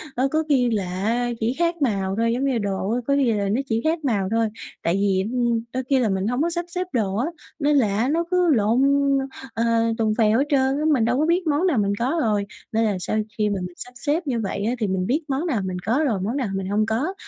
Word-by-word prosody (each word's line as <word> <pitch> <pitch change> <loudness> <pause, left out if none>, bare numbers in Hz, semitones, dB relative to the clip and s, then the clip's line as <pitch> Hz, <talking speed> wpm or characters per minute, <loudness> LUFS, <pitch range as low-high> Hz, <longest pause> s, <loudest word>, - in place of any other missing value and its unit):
ơ, 260 +2 +2
có 315 0 +1
khi 250 -4 +3
là 205 -5 0 0.2
á 240 +3 +1
chỉ 230 +2 0
khác 340 -1 0
màu 195 -7 0
thôi 230 0 +2
giống 255 +3 -1
như 275 - +2
là 235 - 0
đồ 195 -1 -2
á, 240 - +1
có 280 - +3
khi 265 -4 +3
là 200 -2 -1
nó 235 +7 +1
chỉ 225 -3 -1
khác 320 +1 +1
màu 205 -7 +1
thôi. 225 0 +2 0.4
Tại 170 - +1
vì, 195 -1 +1
ừm, 240 -2 +1
đôi 260 - -2
khi 270 -2 +4
là 225 -4 +1
mình 190 +1 -1
hổng 245 +4 0
có 335 - +2
sắp 345 0 -3
xếp 360 +1 -3
đồ 205 -6 0
á, 245 +7 0 0.3
nên 290 0 +3
là 210 -6 +2
á 245 +5 +1
nó 335 +3 +1
cứ 360 -1 +3
lộn, 225 +3 +2 0.7
ờ, 230 - -1 0.3
tùng 220 -1 +1
phèo 220 +1 +3
hết 280 - +2
trơn 270 -1 +2
á, 305 - -1
mình 240 -6 +2
đâu 245 +2 +1
có 305 - +3
biết 340 +1 +1
món 305 +5 +2
nào 315 -8 +1
mình 200 -1 +1
có 265 +8 0
rồi. 210 -4 +1 0.3
Nên 225 +1 +1
là 205 -3 0
sau 215 - -2 0.2
khi 210 -1 +1
mà 200 -2 -1
mình 180 -1 -6
sắp 250 - -9
xếp 295 +6 -1
như 245 -4 0
vậy 200 -1 -3
á 235 - +1
thì 215 - 0
mình 185 -1 -1
biết 290 +7 +1
món 280 +3 -1
nào 235 -10 0
mình 185 -1 -3
có 240 +6 +2
rồi 255 - +1
món 230 +8 -2
nào 255 -6 -1
mình 195 -1 -3
hông 215 +1 +2
có 250 +12 -1
235 Hz, 280 wpm, -23 LUFS, 210-280 Hz, 0.7 s, khi